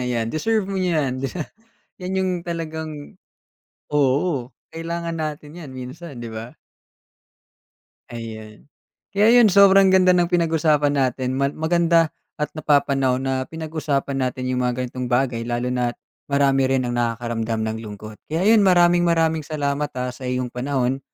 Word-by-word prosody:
Ayan, 120 -2 -2
deserve 215 +7 0
mo 195 0 -3
'yan. 150 -8 0 0.8
Yan 185 +1 -3
yong 190 -1 +1
talagang 160 -3 -6 0.7
oo, 140 -1 +1 0.2
kailangan 170 0 -4
natin 155 -1 -5
'yan 160 -6 -9
minsan, 130 +3 -8
'di 115 -1 -6
ba? 115 +2 -8 1.5
Ayan. 110 -2 -9 0.5
Kaya 215 +4 +5
yon 215 -5 +5
sobrang 195 -1 +6
ganda 185 -1 +5
ng 175 -1 +2
pinag-usapan 155 -4 +2
natin. 130 -1 0
Ma 140 +1 +1
maganda 165 0 +2 0.3
at 150 - 0
napapanahon 135 -4 +2
na 130 -1 -1
pinag-usapan 155 -4 -3
natin 130 -1 -2
yung 125 0 0
mga 125 +1 -1
ganitong 125 0 -5
bagay. 125 -2 +1
Lalo 120 +1 -2
na't 125 -1 -1 0.3
marami 140 -1 +3
rin 130 -2 +1
ang 120 - -2
nakakaramdam 115 -1 -2
ng 110 - -3
lungkot. 105 +1 -9
Kaya 165 +5 -1
ayon, 220 -2 +6
maraming 175 -1 +5
maraming 160 -2 +1
salamat, 145 -1 -2
ah, 125 0 -2
sa 130 - -11
iyong 125 0 -1
panahon, 130 0 -1
140 Hz, 140 wpm, -22 LUFS, 125-165 Hz, 1.5 s, sobrang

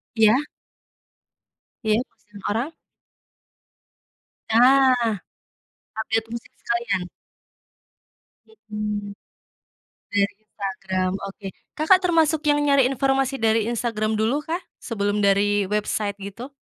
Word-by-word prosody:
Iya. 220 +2 +5 1.5
Iya 215 0 +3
masukin 210 -4 -14
orang. 235 +8 -1 1.8
Nah, 250 0 +5 0.9
update 225 0 0
musik 235 0 -7
sekalian. 230 -6 -1 1.4
Mhm, 210 -2 -5 1.0
dari 200 -2 +2
Instagram 190 -3 -3 0.2
oke 195 0 -9 0.3
Kakak 320 +5 +5
termasuk 325 -4 +3
yang 290 0 +4
nyari 280 -3 +5
informasi 270 0 +1
dari 225 0 +3
Instagram 220 -2 -1
dulu 230 +8 +1
kah? 340 +3 -2 0.2
Sebelum 205 -2 -1
dari 200 0 +3
website 210 -1 -1
gitu? 200 +6 -8
220 Hz, 90 wpm, -23 LUFS, 205-255 Hz, 1.8 s, Iya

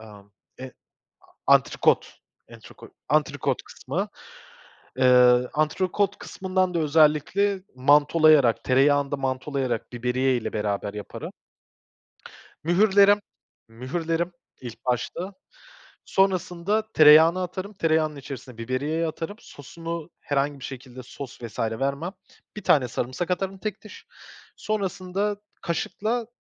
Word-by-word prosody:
emm, 105 -2 -14 0.3
e - - -6 0.6
a - - +2
antrikot, - - +1 0.3
antrikot, - - -14 0.2
antrikot - - 0
kısmı. - - -4 0.9
Eee, 125 -1 +5
antrikot 185 +6 0
kısmından 185 -1 -2
da, 170 - +1
özellikle, 160 +6 +2
mantolayarak, 145 -1 +4
tereyağında 140 +2 +3
mantolayarak, 130 -2 -3
biberiye 125 +2 0
ile 120 - -4
beraber 105 -1 -2
yaparım. 105 - -7 1.3
Mühürlerim 200 +3 +5 0.5
mühürlerim 165 +9 -3 0.3
ilk 120 -3 -10
başta. 150 +10 -2 0.7
Sonrasında 195 +3 0
tereyağına 160 +4 +7
atarım. 185 +3 -6
Tereyağının 160 -4 +1
içerisine 135 -3 -9
biberiyeyi 140 +8 -2
atarım. 165 +5 -5
Sosunu 165 +4 -8
herhangi 145 0 -1
bir - - -9
şekilde, 130 -1 -9
sos, 125 0 -10
vs. 115 -2 -9
vermem. 140 +10 -2 0.4
1 210 - -6
tane 130 -5 +3
sarımsak 130 +9 -3
atarım 190 +1 -2
tek 210 +1 -5
diş. 210 - -13 0.5
Sonrasında 200 -1 -2 0.3
kaşıkla 215 +7 -2
150 Hz, 100 wpm, -25 LUFS, 130-185 Hz, 1.3 s, tereyağına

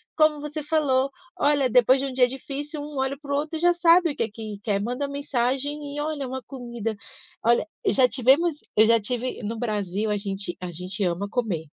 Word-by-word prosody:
Como 310 -2 +3
você 300 +1 -4
falou: 285 -3 +1 0.3
“Olha, 285 -4 +3
depois 250 +3 +5
de 275 - -1
um - - -5
dia 250 -1 +4
difícil, 285 +4 -5
um 295 -1 -7
olha 265 +1 -1
para 285 -1 -7
o - - +2
outro 305 +2 -2
e - - -6
já 350 0 +5
sabe 345 0 +5
o - - -8
que 230 - -1
que 215 -1 -7
quer, 200 -3 0
manda 250 +6 -2
uma 280 - -6
mensagem 280 +2 -1
e - - -3
olha 295 -3 -3
uma 260 0 -5
comida”. 235 -4 -5 0.5
Olha, 235 +5 +3 0.2
já 260 -9 +5
tivemos 275 +7 +3 0.2
eu 215 - +6
já 230 +1 +5
tive 245 +4 -3
no 225 +2 -3
Brasil, 210 -2 -2
a 210 - +1
gente 195 -3 -3
a 180 - -5
gente 180 +4 -4
ama 180 +3 -1
comer, 210 -9 -2
260 Hz, 215 wpm, -25 LUFS, 220-290 Hz, 0.5 s, eu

